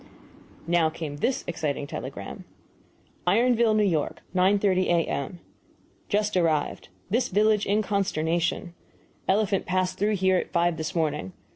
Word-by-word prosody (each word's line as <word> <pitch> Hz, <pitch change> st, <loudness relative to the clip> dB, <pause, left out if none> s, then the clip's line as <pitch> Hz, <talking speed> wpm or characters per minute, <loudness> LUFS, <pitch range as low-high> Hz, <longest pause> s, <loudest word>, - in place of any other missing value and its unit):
Now 170 Hz, -1 st, +3 dB
came 155 Hz, -2 st, -6 dB
this 250 Hz, -, 0 dB
exciting 150 Hz, -4 st, -2 dB
telegram: -, -, -7 dB, 0.8 s
IRONVILLE, 230 Hz, +2 st, +4 dB
N. 205 Hz, -3 st, +3 dB
Y., 155 Hz, -3 st, +1 dB, 0.3 s
9.30 190 Hz, 0 st, +3 dB
A.M. 170 Hz, -1 st, 0 dB, 0.7 s
Just 210 Hz, 0 st, +1 dB
arrived. 165 Hz, -4 st, 0 dB, 0.2 s
This 240 Hz, +4 st, +2 dB
village 210 Hz, +1 st, +2 dB
in 210 Hz, +2 st, +2 dB
consternation. 175 Hz, -2 st, -1 dB, 0.5 s
Elephant 200 Hz, 0 st, +1 dB
passed 185 Hz, 0 st, 0 dB
through 210 Hz, +2 st, +2 dB
here 190 Hz, -1 st, +3 dB
at -, -, -2 dB
five 170 Hz, -1 st, +1 dB
this 160 Hz, +4 st, -4 dB
morning. 150 Hz, -, -1 dB
185 Hz, 125 wpm, -26 LUFS, 165-205 Hz, 0.8 s, IRONVILLE